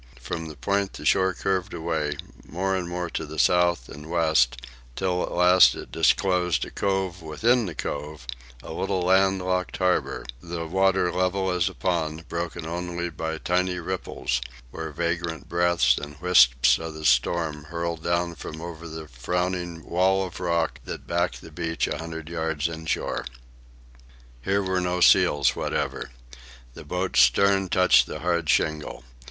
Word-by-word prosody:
From 80 -1 -5
the 75 - -9
point 100 +9 -1
the - - -9
shore 95 -1 +3
curved 95 +1 -1
away, 80 -3 -2 0.3
more 95 +3 -2
and 90 -2 -3
more 90 0 -3
to - - -3
the 80 0 -8
south 85 -2 +3
and 75 +2 -10
west, 80 -8 +2 0.4
until 90 -2 0
at - - -3
last 90 +1 +6
it - - -9
disclosed 90 -3 +2
a - - -10
cove 95 -2 -1
within 110 +9 +1
the 85 - -6
cove, 75 -1 -5 0.4
a - - -7
little 90 - -1
land 95 +1 +3
locked 90 0 -1
harbour, 90 -1 0 0.2
the 85 0 -5
water 95 +1 +2
level 95 +1 0
as 90 +1 +1
a 95 - -12
pond, 80 -3 -2
broken 85 0 -4
only 85 +1 -4
by 80 0 -4
tiny 90 +2 0
ripples 85 -8 -3 0.3
where 80 +3 -5
vagrant 85 +1 -3
breaths 85 -7 +3
and 75 0 -9
wisps 65 -8 +5
of 80 -1 -6
the 80 0 -7
storm 75 +4 +1
hurtled 85 0 -4
down 85 0 0
from 80 -1 -8
over 85 0 -7
the 80 -1 -8
frowning 85 +5 -3
wall 95 +2 +2
of 90 - -8
rock 85 -2 0
that - - -7
backed 85 +1 -1
the 80 - -12
beach 85 +1 -2
a - - -3
hundred 80 -1 -6
feet 80 -2 -1
inshore. 80 0 -2 1.2
Here 100 +7 0
were 95 -1 0
no 90 0 -1
seals 85 -7 +5
whatever. - - -2 0.6
The - - -11
boat's 90 +4 0
stern 95 +10 +4
touched 90 +1 +5
the 75 - -6
hard 85 -2 0
shingle. 75 +2 0
85 Hz, 160 wpm, -25 LUFS, 80-90 Hz, 1.2 s, last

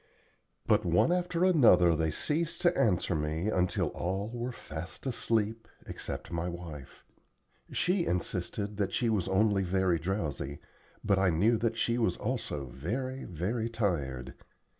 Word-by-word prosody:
But - - +3
one 90 - +3
after 180 0 +1
another 105 - +6
they 80 0 +1
ceased 165 - -1
to 175 0 +4
answer 105 -9 +2
me 80 +5 -1
until 90 -3 +1
all 95 +4 -3
were 120 +1 -4
fast 80 - -8
asleep 115 -3 0 0.2
except - - -6
my 85 +1 -2
wife. 85 -6 -9 0.7
She 180 -1 +1
insisted 95 +3 -2
that 100 -2 -1
she 120 - +1
was 100 -5 0
only 100 +1 +3
very 95 -2 +1
drowsy, 80 -6 -3 0.5
but 100 -2 +3
I 95 -1 +4
knew 100 +8 +3
that 115 -1 0
she 120 +1 +1
was 115 - +1
also 110 - -3
very, 115 - -4
very 105 +7 -2
tired. 70 - -2
95 Hz, 140 wpm, -30 LUFS, 85-115 Hz, 0.7 s, another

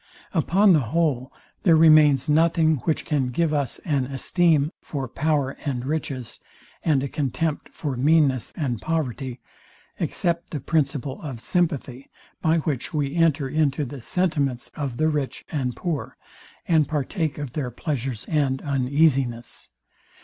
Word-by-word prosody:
Upon 190 +4 +4
the 155 - +5 0.2
whole, 140 -6 +1 0.3
there 170 -4 +5
remains 155 -4 +6
nothing, 160 0 +3
which 160 - 0
can 140 -4 0
give 155 +5 0
us 140 -5 -1
an 140 -5 +1
esteem 150 +3 +2
for 135 -3 -4
power 145 0 0
and 130 -3 -2
riches, 140 -4 -3 0.4
and 145 -4 +2
a - - -1
contempt 150 +2 -2
for 145 -4 -4
meanness 135 -2 +2
and 125 -8 -2
poverty, 135 -5 -3 0.6
except 170 -1 -1
the 150 - -4
principle 140 -2 -1
of 135 -7 -6
sympathy, 140 -4 -1 0.3
by 160 0 +3
which 155 -1 -2
we 145 -2 0
enter 160 -5 +2
into 150 0 +1
the 135 0 -8
sentiments 140 -6 -1
of 135 -5 -4
the 155 - +2
rich 150 -4 -2
and 130 -5 -2
poor, 165 -5 -4 0.5
and 160 -3 +3
partake 155 +1 -2
of 145 -4 -5
their 140 -5 -2
pleasure 130 0 -3
and 140 -4 +1
uneasiness. 135 -3 0
145 Hz, 140 wpm, -24 LUFS, 130-160 Hz, 0.6 s, remains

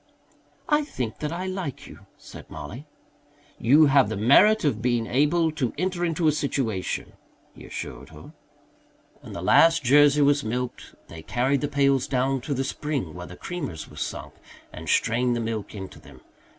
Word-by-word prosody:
"I 300 -1 +2
think 125 - -5
that 150 0 -3
I 175 +2 -4
like 185 -7 -5
you," - - -14
said - - -13
Mollie. 145 +5 -9 0.7
"You 145 +7 +5
have 135 -5 +4
the 110 - -3
merit 155 - +5
of 115 -7 0
being 120 -1 +1
able 150 +7 +2
to 140 -6 -2
enter 180 +1 -1
into 165 -1 0
a - - +5
situation," 135 -9 -2 0.4
he - - -13
assured - - -7
her. - - -13 0.9
When - - -11
the 85 - -6
last 165 - +5
Jersey 145 +3 +5
was 140 0 +3
milked 125 +3 -5
they 80 -1 -10
carried 130 - 0
the 145 - 0
pails 140 -2 +2
down 135 0 0
to 140 +3 -3
the 135 - -1
spring 135 - -3
where 90 0 -8
the 90 - -11
creamers 145 - -6
were - - -13
sunk - - -5 0.4
and - - -8
strained 120 +1 +2
the - - -2
milk 110 -2 -4
into 95 -2 -8
them. - - -16
140 Hz, 175 wpm, -25 LUFS, 120-155 Hz, 0.9 s, You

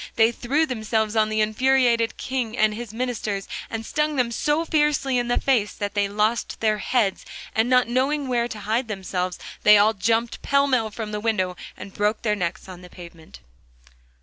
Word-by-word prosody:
They 225 0 +4
threw 275 +7 0
themselves 220 -4 -1
on 215 -1 +3
the 215 0 0
infuriated 235 +1 +2
King 255 -3 -3
and 215 0 +3
his 230 0 -7
ministers, 220 -4 -3 0.2
and 225 0 -5
stung 300 +3 -1
them 250 -3 +1
so 300 +7 0
fiercely 295 -5 +1
in 240 - -2
the 245 - +1
face 235 -7 +1
that 205 -1 -4
they 205 -1 +1
lost 215 +3 -1
their 215 -1 +1
heads, 210 -2 0 0.3
and 225 +2 +1
not 250 -2 +4
knowing 270 +4 0
where 240 -2 0
to 215 -3 -8
hide 225 +5 -1
themselves 185 -3 -3 0.2
they 210 0 +7
all 210 +2 +4
jumped 225 +3 0
pell 280 0 +2
mell 250 -5 +1
from 215 0 -6
the 210 - -3
window 205 -5 -1 0.2
and 195 - -10
broke 210 +1 -1
their 210 -2 +1
necks 175 -2 -4
on 180 -1 -10
the 180 - -13
pavement. 170 -3 -13
225 Hz, 190 wpm, -23 LUFS, 210-250 Hz, 0.3 s, they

